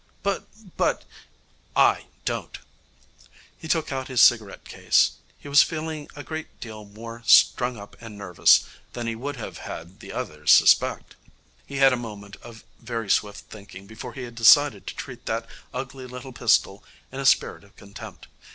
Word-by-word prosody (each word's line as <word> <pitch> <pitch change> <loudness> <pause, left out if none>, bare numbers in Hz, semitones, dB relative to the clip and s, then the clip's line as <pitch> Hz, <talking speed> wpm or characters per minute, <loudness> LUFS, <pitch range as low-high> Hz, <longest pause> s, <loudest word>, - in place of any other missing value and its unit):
'But 200 -1 -2 0.3
but - - 0 0.4
' - - -36
'I - - +3 0.2
don't.' - - -4 1.0
He 160 - -10
took 160 -2 0
out 130 -1 -3
his 130 -3 -1
cigarette 110 -4 +4
case. - - +2 0.3
He - - -13
was 140 0 +6
feeling 155 -2 -3
a 145 - -8
great 160 +1 -8
deal 110 -2 -9
more 115 +3 -10
strung 125 -1 +5
up 100 0 -12
and 115 -2 -10
nervous 90 -4 +4 0.3
than 120 - -5
he 115 - -2
would 140 +5 -5
have 120 - -8
had 85 +3 -9
the - - -10
others - - -1
suspect. - - +4 0.5
He 140 - -8
had 135 - +1
had 135 -1 +7
a - - 0
moment 105 -4 -9
of 115 -2 -13 0.2
very 115 -4 -4
swift 105 +1 -1
thinking 100 -2 -12
before 110 +3 -9
he 130 - -7
had 120 -1 -8
decided 145 +6 +5
to - - -6
treat 125 -3 -9
that 115 +1 -2 0.3
ugly 130 0 -7
little 125 +1 -9
pistol 110 -4 +1 0.3
in 135 - -7
a - - -3
spirit - - +2
of 100 +2 -22
contempt. 100 0 -12
120 Hz, 175 wpm, -24 LUFS, 105-135 Hz, 1.0 s, had